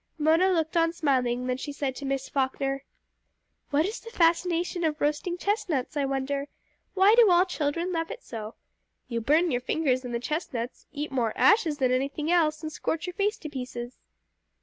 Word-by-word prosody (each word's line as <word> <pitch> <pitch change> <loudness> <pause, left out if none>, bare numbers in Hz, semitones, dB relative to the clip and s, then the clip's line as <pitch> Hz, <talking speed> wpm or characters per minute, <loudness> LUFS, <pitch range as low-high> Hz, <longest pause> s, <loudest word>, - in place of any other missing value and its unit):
Mona 325 +5 +4
looked 325 -2 0
on 330 0 +3
smiling; 255 -6 0
then 250 0 -1
she 290 +2 -5
said 280 -2 -3
to 285 - -6
Miss 270 0 -2
Falkner 270 0 -1 0.9
"What 295 +2 +2
is 425 +4 -4
the 460 - -10
fascination 345 -2 +1
of 310 -1 0
roasting 300 +4 -1
chestnuts, 365 - -1
I 285 -1 +1
wonder. 275 +1 -2 0.5
Why 390 +2 +6
do 460 -3 +7
all 355 +1 +5
children 335 0 -2
love 330 -1 -2
it - - -8
so? 220 -1 -7 0.5
You 235 -1 -2
burn 310 +8 +3
your 245 - 0
fingers 260 -1 0
and 250 - -5
the 235 - -1
chestnuts, 250 -4 -4
eat 295 0 -4
more 235 -5 0
ashes 350 -9 +4
than 260 -3 +2
anything 280 +5 -1
else, 310 -3 +2
and 310 - -4
scorch 315 +1 -2
your 360 - -5
face 410 +3 0
to 310 - -7
pieces!" 250 -3 -6
300 Hz, 185 wpm, -27 LUFS, 265-345 Hz, 0.9 s, do